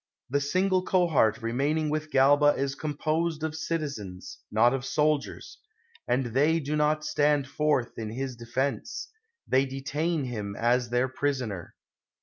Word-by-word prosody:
The 140 +1 +2
single 185 +6 +1
cohort 160 - +2
remain 135 +7 0
ing 155 -1 0
with 155 0 -2
Galba 145 +2 +5
is 135 0 -1
composed 155 +2 -2
of 160 -1 -2
citizens, 140 - -4
not 115 +4 +4
of 135 -1 -2
soldiers; 150 +1 -1 0.5
and 130 +1 +1
they 155 +5 +3
do 150 0 -2
not 150 0 +1
stand 150 -2 +2
forth 140 -4 0
in 110 -1 -4
his 130 +3 -4
de 115 0 -11
fense 130 +4 -2 0.2
— 465 0 -53
they 135 +1 +3
detain 145 +4 -2
him 105 -6 -4
as 120 +2 +1
their 125 +2 +1
prisoner. 130 - -3
140 Hz, 150 wpm, -27 LUFS, 125-155 Hz, 0.5 s, Galba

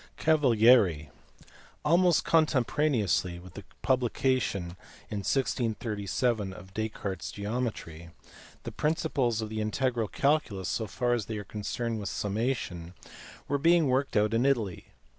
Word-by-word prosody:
Cavalieri*. 115 - +4 0.7
Almost 175 +1 +4
contemporaneously 130 - +1
with 90 0 -13
the 100 - -9 0.2
publica 130 0 +2
tion 95 -7 -3 0.4
in 105 - -2
1637 110 -2 -1
of 95 0 -13
Descartes 105 -3 -4
s - - -7
geometry, 100 -7 -4 0.5
the - - -6
principles 140 -8 0
of 110 - -5
the 110 0 -3
integral 115 +1 0
calculus, 140 - 0
so 110 - -2
far 120 +6 0
as 115 -4 -2
they 110 - -4
are 105 - -5
concerned 110 +3 -4
with 100 -2 -4
summation, 100 -5 -3 0.5
were 140 0 0
being 165 +2 +4
worked 130 -1 +1
out 105 +1 +2
in 115 +2 +2
Italy. 115 -10 0
115 Hz, 130 wpm, -29 LUFS, 100-130 Hz, 0.7 s, Cavalieri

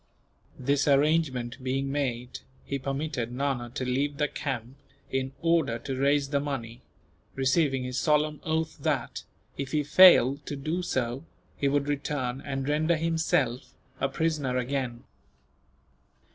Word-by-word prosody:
This 140 +2 +1
arrangement 140 -4 +2
being 135 +1 -1
made, 125 -4 -2 0.3
he 140 - -3
permitted 135 -3 -3
Nana 130 -2 -2
to 130 - -2
leave 140 +3 0
the 150 0 +1
camp 130 -3 -5 0.3
in 130 0 -1
order 165 -8 +2
to 130 +3 -5
raise 140 +1 +2
the 140 -1 +1
money; 120 -5 -5 0.5
receiving 135 0 +2
his 125 0 -2
solemn 150 0 +1
oath 160 0 -2
that, - - -1 0.4
if 135 -1 -4
he 150 -1 +2
failed 145 -4 +7
to 145 - -3
do 155 +6 -2
so, 130 -5 -2 0.3
he 140 - 0
would 140 0 +1
return 140 -3 -2
and 135 -1 -3
render 155 +3 +2
himself 160 -6 0 0.2
a 135 - +1
prisoner 145 -4 -1
again. 125 -2 -2
140 Hz, 135 wpm, -28 LUFS, 130-150 Hz, 0.5 s, failed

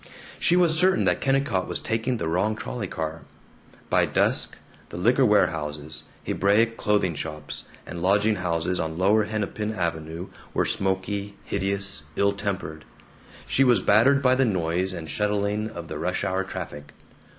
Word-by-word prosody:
She 175 - +3
was 175 -3 +4
certain 185 - +3
that 90 -1 +1
Kennicott 135 -9 +1
was - - -2
taking 115 +2 -1
the 85 - -3
wrong 95 +6 +1
trolley 105 -1 -5
car. 80 -1 -4 0.7
By - - +3
dusk, - - +1 0.3
the - - -7
liquor 120 +9 +3
warehouses, 75 -6 0 0.2
Hebraic 110 +4 +2
clothing 105 -6 +1
shops, 75 0 -6 0.2
and 85 - -7
lodging 100 +3 +3
houses 90 0 -1
on 80 0 -3
lower 105 +4 +3
Hennepin 110 0 -3
Avenue 85 -1 -3 0.3
were - - +2
smoky, 100 +1 -1
hideous, 100 -5 0
ill 100 0 +2
tempered. 95 -6 -4 0.6
She 135 - +3
was 120 -7 +4
battered 135 +7 +4
by 130 -1 +5
the 130 +1 +3
noise 90 -4 0
and 85 -3 -6
shuttling 105 +3 -1
of 85 -6 -8
the - - -6
rush - - -1
hour 95 0 0
traffic. 75 -6 -7
100 Hz, 150 wpm, -25 LUFS, 85-110 Hz, 0.7 s, by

